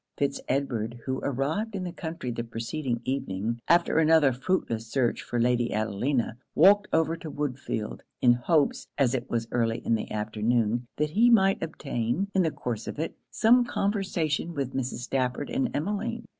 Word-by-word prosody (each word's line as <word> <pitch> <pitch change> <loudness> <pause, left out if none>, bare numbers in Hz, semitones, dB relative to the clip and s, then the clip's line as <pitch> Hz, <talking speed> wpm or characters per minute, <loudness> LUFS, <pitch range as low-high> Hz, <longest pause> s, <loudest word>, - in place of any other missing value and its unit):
Fitz 140 -1 -1
Edward, 120 -4 -1
who 130 0 -1
arrived 155 - -1
in 190 - -3
the 180 - -4
country 160 -6 -5
the 115 - -3
preceding 120 +2 -3
evening, 115 -3 -2
after 170 -1 +4
another 155 -4 +5
fruitless 125 -6 -1
search 120 +1 0
for 120 - -3
Lady 120 0 +2
Adelina, 115 +3 -1 0.2
walked 205 +1 +6
over 160 0 +2
to 165 -1 -8
Woodfield, 140 -7 -3 0.2
in 120 -1 +6
hopes, 140 +4 +1
as 135 -3 +3
it 125 -1 -2
was 115 -1 -1
early 115 -1 +1
in - - +2
the 110 - -1
afternoon, 110 +2 0
that 150 0 0
he 230 +8 +5
might 195 -4 +4
obtain, 155 - -2
in 190 - +3
the 165 - +2
course 120 -6 -5
of - - -5
it, 160 +2 -3
some 245 +3 +5
conversation 185 -8 -1
with 135 -2 -2
Mrs. 130 -2 -3
Stafford 130 - -1
and 255 0 0
Emmeline. 210 +8 -2
135 Hz, 170 wpm, -27 LUFS, 120-170 Hz, 0.2 s, walked